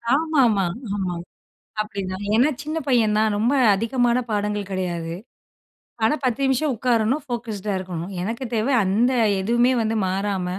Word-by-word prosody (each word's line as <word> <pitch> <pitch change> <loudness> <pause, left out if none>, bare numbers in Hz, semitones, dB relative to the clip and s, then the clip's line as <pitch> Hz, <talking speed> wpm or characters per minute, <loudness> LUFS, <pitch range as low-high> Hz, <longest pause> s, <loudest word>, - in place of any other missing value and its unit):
ஆமாமா, 265 - +2 0.3
ஆமா 185 -3 -2 0.7
அப்படிதான். 195 -2 -5
ஏன்னா 255 +6 +4
சின்ன 310 +2 -3
பையன் 225 -5 +3
தான், 215 -1 +2
ரொம்ப 235 +6 +2 0.2
அதிகமான 240 +2 +1
பாடங்கள் 205 -1 -2
கிடையாது, 170 -3 -3 0.9
ஆனா 260 +7 +3
10 250 +2 0
நிமிஷம் 265 +1 +1
உட்காரணும் 245 +4 +1
ஃபோகஸ்ட் 225 -5 -5
டா 200 - +1
இருக்கணும். 180 0 -5
எனக்கு 230 +7 -3
தேவை 230 +5 +1
அந்த 220 +7 +2 0.3
எதுவுமே 240 +5 +3
வந்து 225 0 -1
மாறாம, 195 -1 -1
220 Hz, 135 wpm, -22 LUFS, 195-245 Hz, 0.9 s, ஏன்னா